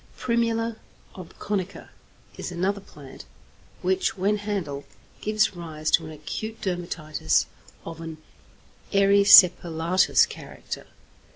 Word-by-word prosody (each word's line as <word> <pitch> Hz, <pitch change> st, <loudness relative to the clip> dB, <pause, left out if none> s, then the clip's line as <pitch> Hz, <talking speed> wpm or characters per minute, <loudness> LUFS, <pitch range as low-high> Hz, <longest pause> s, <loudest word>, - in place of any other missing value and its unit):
=Primula 230 Hz, -1 st, 0 dB, 0.4 s
obconica= 190 Hz, +1 st, -5 dB, 0.5 s
is -, -, -6 dB
another 190 Hz, +3 st, -1 dB
plant 145 Hz, -7 st, -13 dB, 0.6 s
which, 375 Hz, -, 0 dB
when 200 Hz, +3 st, +1 dB
handled, 190 Hz, -9 st, -4 dB, 0.4 s
gives 215 Hz, -2 st, +1 dB
rise 155 Hz, -3 st, -4 dB
to 165 Hz, -, +4 dB
an -, -, -9 dB
acute 215 Hz, +9 st, -6 dB
dermatitis 170 Hz, -, -1 dB, 0.4 s
of 165 Hz, 0 st, -8 dB
an 165 Hz, -1 st, -7 dB, 0.7 s
erysipelatous 185 Hz, -3 st, +5 dB
character. -, -, -9 dB
185 Hz, 95 wpm, -25 LUFS, 165-205 Hz, 0.7 s, erysipelatous